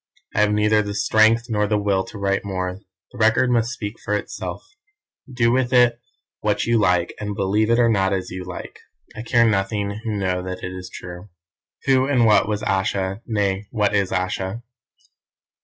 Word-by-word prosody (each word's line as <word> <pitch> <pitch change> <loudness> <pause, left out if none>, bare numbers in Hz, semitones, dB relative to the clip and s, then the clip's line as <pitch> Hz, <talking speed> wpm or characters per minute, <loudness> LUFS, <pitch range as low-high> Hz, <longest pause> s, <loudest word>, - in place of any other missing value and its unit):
"I - - 0
have 105 0 +3
neither 105 +1 +3
the 105 -1 -5
strength 110 +2 +3
nor 105 -2 0
the 105 0 +1
will 100 -2 +1
to 110 - -10
write 100 0 0
more. 95 -1 -3 0.3
The 125 - -12
Record 115 +3 +3
must 115 -1 +2
speak 105 -3 -6
for 105 - -2
itself. 105 - -5 0.7
Do 120 -2 +2
with 125 0 +1
it 120 -2 +4 0.4
what - - 0
you 115 -1 +2
like, 90 -4 +2
and 105 -1 -4
believe 105 +3 +1
it 115 - +4
or 120 -1 +4
not 95 -4 +2
as 95 -2 -2
you 90 0 -5
like. 90 0 -8 0.4
I 110 - -6
care 115 0 +3
nothing 100 0 -1
who 110 -2 -2
know 90 -2 -1
that 90 0 -6
it 90 - -4
is 90 0 -8
true. 90 +3 -9 0.6
"Who 130 -1 +3
and 130 -4 +3
what 105 -1 +4
was 105 0 -2
Ayesha, 95 0 -1
nay, 100 -2 -1
what 105 -2 0
is 100 -2 +1
Ayesha? 95 +4 -2
105 Hz, 190 wpm, -22 LUFS, 95-115 Hz, 0.7 s, it